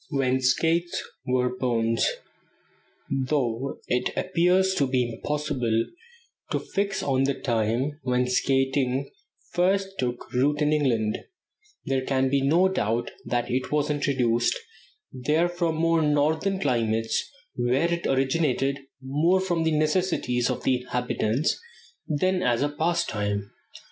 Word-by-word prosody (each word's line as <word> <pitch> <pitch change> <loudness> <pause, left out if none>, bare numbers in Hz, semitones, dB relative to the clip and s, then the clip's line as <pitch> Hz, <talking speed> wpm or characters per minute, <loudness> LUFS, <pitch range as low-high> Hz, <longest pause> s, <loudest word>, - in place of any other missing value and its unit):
WHEN 130 -3 +1
SKATES 165 +7 +1 0.2
WERE 125 0 +1
BONES. 115 -3 +1 1.0
Though 135 -2 -1
it 125 0 +1
appears 185 +2 +2
to 140 -7 +1
be 130 -2 +1
impossible 125 -2 -1 0.6
to - - 0
fix 200 0 -2
on 135 -1 +2
the 140 0 0
time 120 +5 -1
when 125 -1 +1
skating 135 +1 +1 0.4
first 195 +2 +1
took 125 -1 -3
root 145 +4 +2
in 150 0 +2
England, 115 -8 +1 0.7
there 135 -1 0
can 130 0 +1
be 140 0 +2
no 165 +7 +4
doubt 120 - -1
that 120 -1 -1
it 130 +1 -1
was 150 0 +1
introduced 125 -5 +1 0.5
there 150 +6 +1
from 175 -2 -1
more 165 0 +2
northern 155 +6 +1
climates, 115 - 0 0.3
where 130 +7 +1
it 170 0 -2
originated 135 0 +1 0.2
more 155 +8 +2
from 175 -3 0
the 160 -1 +2
necessities 155 -7 +1
of 125 - -3
the 130 - +3
inhabitants 125 +1 -1 0.5
than 180 +5 +1
as 120 +1 +2
a 145 - +1
pastime. 110 - -1
135 Hz, 125 wpm, -26 LUFS, 125-160 Hz, 1.0 s, no